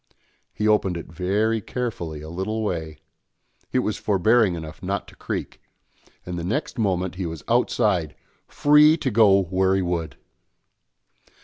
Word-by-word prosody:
He 105 - -1
opened 100 -4 +2
it 85 - -9
very 105 +6 0
carefully 85 -11 -4
a 80 - -8
little 110 +5 -3
way; 80 -6 -3 0.7
it - - 0
was 105 - -1
forbearing 105 0 +3
enough 80 -1 -8
not 100 +1 -3
to - - -17
creak, - - -5 0.6
and 90 -1 -4
the - - -5
next 125 - -3
moment 95 -4 0
he 90 - -1
was 80 -1 -7
outside, 105 -8 +1 0.3
free 150 +2 +5
to 135 -5 -2
go 100 -3 +5
where 95 +1 +1
he 95 - +1
would! 85 -4 -3
95 Hz, 145 wpm, -23 LUFS, 85-110 Hz, 0.7 s, free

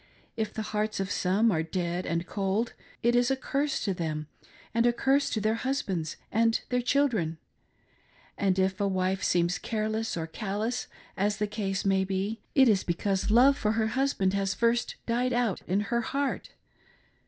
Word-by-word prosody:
If 220 -2 -2
the 220 - -4
hearts 215 0 -2
of 195 -1 -2
some 205 +5 +2
are 160 -4 +1
dead 175 +2 -2
and 170 +1 -1
cold, 200 +5 -1 0.3
it 240 +1 +3
is 245 +1 +3
a 270 - +2
curse 275 +2 -1
to 195 - +1
them 155 -4 -3 0.5
and 230 +1 +3
a 240 - +3
curse 270 +3 +2
to 220 - -1
their 215 +1 +1
husbands 200 - -2
and 225 +1 +3
their 250 0 +1
children; 240 - +1 1.0
and 195 -2 +1
if 190 +1 +1
a 200 - +2
wife 190 0 0
seems 175 -1 +2
careless 220 -1 -2
or 165 - -2
callous, 215 +7 -3 0.3
as 205 +1 0
the 210 - 0
case 200 -2 -3
may 195 -1 +3
be, 195 +4 -2 0.2
it 265 -2 +7
is 205 -4 +3
because 190 +3 -1
love 250 +6 +6
for 215 -1 +1
her 220 0 +1
husband 260 -8 +1
has 195 -1 0
first 235 +1 +1
died 245 +2 0
out 240 -6 0
in 190 +3 +1
her 235 +3 0
heart. 275 +4 -2
210 Hz, 175 wpm, -28 LUFS, 190-235 Hz, 1.0 s, it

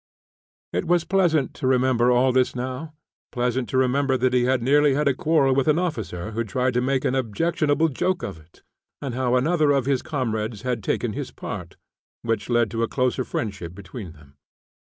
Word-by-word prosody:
It - - -1
was 175 -1 +3
pleasant 170 -8 +2
to 130 - -3
remember 125 -2 +3
all 125 +1 +4
this 130 0 +2
now; 130 +5 -5 0.4
pleasant 125 0 -1
to 130 - 0
remember 130 +1 +2
that 125 0 +1
he 125 -1 +3
had 130 -1 +1
nearly 145 +2 +4
had 150 +1 +1
a 140 - +4
quarrel 140 -1 +2
with 135 +1 +1
an 155 0 +4
officer 110 - -3
who 115 +2 -1
tried 125 +5 -1
to 125 - +1
make 130 +1 0
an - - +1
objectionable 145 +5 +1
joke 180 +6 -1
of 80 - -5
it, 80 +2 -23 0.4
and 135 -4 -4
how 125 0 +1
another 155 +4 +2
of 140 -3 +2
his 135 -2 +1
comrades 115 -7 -3
had 125 -4 -2
taken - - -1
his - - -4
part, - - -7 0.5
which 115 -2 -2
led 120 -2 +2
to 115 0 -2
a 115 - +1
closer 130 +1 0
friendship 95 -8 -4
between 95 -2 -9
them. 75 -3 -20
130 Hz, 195 wpm, -24 LUFS, 115-140 Hz, 0.5 s, all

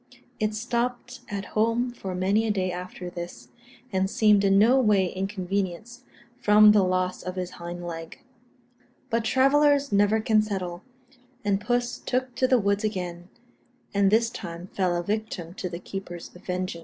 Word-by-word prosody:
It 215 0 0
stopped 245 +2 -2
at 200 -1 -4
home 230 +3 +1
for 190 -6 -6
many 200 +5 +1
a - - +2
day 185 -3 -1
after 180 0 -7
this, 175 -9 -8 0.4
and 190 0 +1
seemed 210 -2 +4
in 195 0 +4
no 235 +6 +5
way 205 -7 +3
inconvenienced 195 +4 -3 0.3
from 210 -1 +7
the 210 -1 +5
loss 185 0 0
of 185 +1 -6
its 180 -1 -3
hind 175 0 -7
leg. 165 -1 -7 0.9
But 230 0 +1
travellers 280 +4 +3
never 205 +2 +3
can 215 -1 +3
settle, 185 -4 -4 0.6
and 200 -1 +1
puss 240 +2 -1
took 255 0 -2
to 255 - +3
the 255 - +4
woods 200 -1 +1
again, 180 -4 -4 0.6
and 200 -1 +3
this 225 +2 +3
time 175 -3 -7
fell 185 -3 +1
a 175 - -1
victim 205 -4 -3
to 185 -1 -5
the 170 - -5
keeper's 180 -2 -7
vengeance. 180 -1 -4
200 Hz, 160 wpm, -26 LUFS, 180-225 Hz, 0.9 s, from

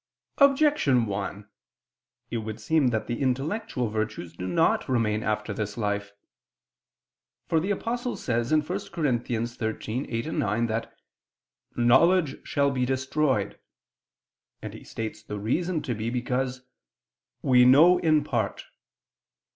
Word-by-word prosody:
Objection 280 - +4
1: 100 0 -4 0.8
It 120 - -1
would 110 -1 -5
seem 160 -4 +2
that 110 -3 0
the 120 +2 -4
intellectual 135 - -1
virtues 105 -5 -4
do 90 +2 -5
not 90 - +1
remain 110 -4 +1
after 105 -1 -2
this 105 +1 -4
life. 105 -2 -2 1.3
For 160 - +2
the 180 +5 -3
Apostle 240 +4 -2
says 120 -1 -1
(1 155 -1 +4
Cor. - - -2
13:8, 120 - -3
9) 110 +2 0
that 115 0 -4 0.8
"knowledge 150 +7 +3
shall 140 0 +2
be 130 -2 -1
destroyed," 130 +2 0 1.0
and - - -7
he - - -11
states 110 -1 -6
the 105 -1 -6
reason 160 - -1
to 125 - -2
be 110 +1 -3
because 125 +1 -2 0.8
"we 125 -1 +5
know 155 +8 +7
in 155 -3 +3
part." - - -2
125 Hz, 125 wpm, -26 LUFS, 110-150 Hz, 1.3 s, know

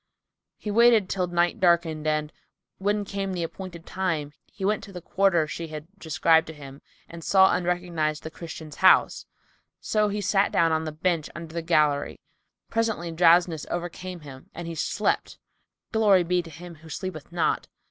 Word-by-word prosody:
He 210 - -5
waited 230 -2 +5
till 185 -2 0
night 175 0 +1
darkened 165 -3 +2
and, 155 0 -1 0.5
when 205 +1 0
came 195 -1 -3
the 175 -2 -2
appointed 170 0 -8
time, 165 -6 -2
he 195 - -6
went 210 0 0
to 200 - -12
the 180 - -7
quarter 180 -2 +2
she 165 +2 -6
had 155 -1 -7
described 160 -1 +3
to 160 - -7
him 140 -1 -11 0.3
and 170 -1 -10
saw 190 +2 +5
and 180 -1 -2
recognised 170 -4 -1
the 160 - -6
Christian's 160 -2 -9
house; 190 -1 +4 0.5
so 215 -1 +1
he 205 +1 -2
sat 200 0 +2
down 165 +1 +3
on 160 0 0
the 155 - -3
bench 160 0 -1
under 165 -1 -8
the 170 - -2
gallery. 150 -4 +1 0.5
Presently 220 -7 -1
drowsiness 170 -1 +3
overcame 175 +1 -5
him 135 -3 -12
and 170 0 -6
he 170 - -4
slept 160 - -1 0.5
(Glory 205 -5 +4
be 180 +1 +1
to 170 - -12
Him 170 +3 -10
who 160 - -13
sleepeth 175 -2 -6
not!? 170 -2 0
170 Hz, 175 wpm, -26 LUFS, 160-190 Hz, 0.5 s, waited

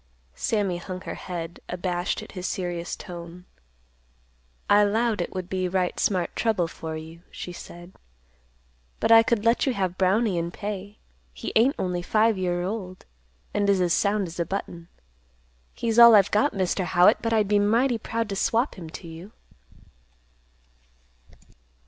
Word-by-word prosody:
Sammy 200 - -1
hung 185 +1 -7
her - - -6
head, 170 -2 -6
abashed 180 0 -2
at - - -12
his 180 -1 -5
serious 175 -2 -3
tone. 175 -1 -10 1.2
"I 205 0 +5
'lowed 220 +2 +1
it - - -4
would 185 -1 -4
be 185 -1 -1
right 180 0 -1
smart 185 -4 0
trouble 215 -7 +1
for 160 -1 -6
you," 160 +1 -10
she 180 - -8
said. 175 +1 -11 1.1
"But - - +1
I 225 0 +9
could 225 -1 0
let 230 +4 +3
you 260 - +1
have 185 -2 -2
Brownie 190 0 +2
in 170 0 -2
pay; 205 +2 -6 0.4
he - - -6
ain't 250 +6 +4
only 180 -1 -2
five 215 +4 +2
year 175 -2 -1
old, 185 -2 -5 0.5
and 205 -1 +1
is 195 -1 +3
as 175 -2 +2
sound 205 0 +1
as 170 0 -9
a - - +2
button. 170 -3 -5 0.9
He's 230 -1 0
all 235 -1 +10
I've 200 -1 +5
got, 275 +8 +3
Mr. 190 0 0
Howitt. 180 +4 +5
But 230 - -1
I'd 215 -2 +2
be 205 0 +3
mighty 230 +4 +2
proud 225 +1 -3
to 200 - -3
swap 230 +3 0
him 165 -3 -8
to 170 - -9
you." 165 +6 -11
190 Hz, 160 wpm, -25 LUFS, 175-215 Hz, 1.2 s, all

